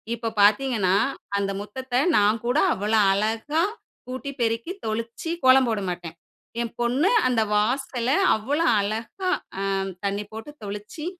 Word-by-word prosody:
இப்போ 230 0 -5
பார்த்தீங்கன்னா, 210 -3 +3 0.4
அந்த 195 0 -1
முற்றத்த 250 +4 -3 0.2
நான் 210 +2 +4
கூட 250 +5 +1 0.2
அவ்வளோ 215 +3 +1
அழகா 225 +10 0 0.5
கூட்டி, 260 +2 -5
பெருக்கி, 230 +8 0
தொளிச்சி, 230 +8 -3
கோலம் 260 -1 +6
போட 220 -2 0
மாட்டேன், 175 -2 -6 0.5
என் 230 - -4
பொண்ணு 255 +9 +2 0.2
அந்த 240 -3 +2
வாசல 245 +2 0 0.3
அவ்வளோ 285 +10 -1 0.2
அழகா 225 - -3 0.3
ஆ - - -2 0.4
தண்ணி 200 +1 -1
போட்டு 225 +7 -8
தொளிச்சி, 210 +10 -7
230 Hz, 130 wpm, -24 LUFS, 210-260 Hz, 0.5 s, கோலம்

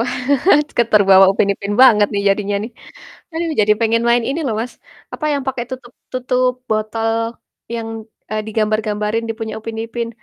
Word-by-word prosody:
Wah, 240 - -1 0.7
ke - - +7
terbawa 195 -2 +7
Upin 200 - +1
Ipin 200 +1 -5
banget 210 -5 +6
nih 200 - -1
jadinya 200 0 0
nih. 225 - -6 0.6
Aduh, 330 0 -2
jadi 210 0 +4
pengen 230 +1 +2
main 235 -1 +3
ini 300 +5 -2
loh, 225 - -1
Mas, 245 +1 -5 0.4
apa, 305 - -6
yang 280 -1 -1
pake 260 -2 -2
tutup 250 -2 -8 0.2
tutup 255 0 +1 0.2
botol 220 +1 -1 0.6
yang, 225 -1 -4 0.4
eee, 215 0 -2
digambar-gambarin 215 0 -1
di 225 - -2
punya 220 -1 -4
Upin 225 0 -7
Ipin, 230 0 -4
225 Hz, 170 wpm, -18 LUFS, 210-240 Hz, 0.7 s, ke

